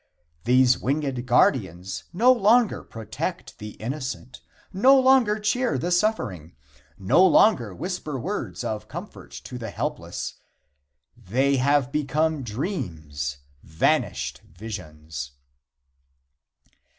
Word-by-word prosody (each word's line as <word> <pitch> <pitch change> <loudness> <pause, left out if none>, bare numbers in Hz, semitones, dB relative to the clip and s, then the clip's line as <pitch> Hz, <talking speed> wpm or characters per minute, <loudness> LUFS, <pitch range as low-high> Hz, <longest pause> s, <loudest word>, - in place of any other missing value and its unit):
These 130 +1 +4
winged 135 -3 -2
guardians 95 - +1
no 235 +9 +5
longer 235 -1 +3
protect 115 - -6
the 105 -1 -7
innocent; 130 +1 -6 0.3
no 265 +8 +6
longer 260 -5 +4
cheer 230 +4 0
the 175 - -2
suffering; 125 - -1 0.4
no 100 - +4
longer 135 - +4
whisper 175 - -4
words 130 - -4
of 105 -1 -4
comfort 175 - -9
to 125 -2 -8
the 115 -2 -5
helpless. - - -4 0.8
They 130 +6 +1
have 140 0 +2
become 150 +1 0
dreams 85 - -4 0.2
vanished 80 0 0
visions. 75 -8 -8
130 Hz, 100 wpm, -24 LUFS, -, 0.8 s, no